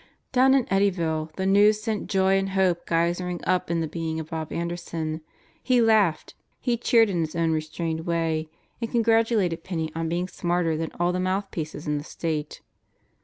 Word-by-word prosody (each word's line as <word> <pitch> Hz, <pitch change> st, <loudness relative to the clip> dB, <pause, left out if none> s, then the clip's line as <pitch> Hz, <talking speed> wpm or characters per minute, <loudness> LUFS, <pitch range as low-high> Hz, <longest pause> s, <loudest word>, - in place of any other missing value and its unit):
Down 265 Hz, +1 st, +5 dB
in 265 Hz, -3 st, +3 dB
Eddyville 170 Hz, -5 st, 0 dB
the 190 Hz, -, -2 dB
news 205 Hz, +2 st, +5 dB
sent 215 Hz, -1 st, -3 dB
joy 190 Hz, -1 st, +3 dB
and 195 Hz, 0 st, -2 dB
hope 190 Hz, -3 st, +1 dB
geysering 175 Hz, +1 st, 0 dB
up 185 Hz, -1 st, +1 dB
in 170 Hz, -1 st, 0 dB
the 160 Hz, -, -1 dB
being 160 Hz, 0 st, -3 dB
of 160 Hz, -1 st, -7 dB
Bob 160 Hz, -1 st, -4 dB
Anderson. 170 Hz, -2 st, -3 dB, 0.4 s
He 255 Hz, -2 st, +3 dB
laughed. 215 Hz, -7 st, +3 dB, 0.3 s
He 245 Hz, -2 st, 0 dB
cheered 230 Hz, -2 st, +3 dB
in 175 Hz, -, -1 dB
his 160 Hz, -1 st, -2 dB
own 165 Hz, -1 st, +1 dB
restrained 160 Hz, +1 st, -3 dB
way 165 Hz, -2 st, 0 dB, 0.3 s
and 230 Hz, -, -2 dB
congratulated 225 Hz, -7 st, +2 dB
Penney 160 Hz, -4 st, -3 dB
on 165 Hz, 0 st, -2 dB
being 175 Hz, +2 st, -1 dB
smarter 175 Hz, -3 st, 0 dB
than 160 Hz, 0 st, -2 dB
all 175 Hz, +1 st, +2 dB
the 180 Hz, -, -1 dB
mouthpieces 185 Hz, -5 st, -3 dB
in 150 Hz, -1 st, 0 dB
the -, -, -7 dB
State. 155 Hz, -2 st, -4 dB
175 Hz, 175 wpm, -25 LUFS, 160-195 Hz, 0.4 s, Down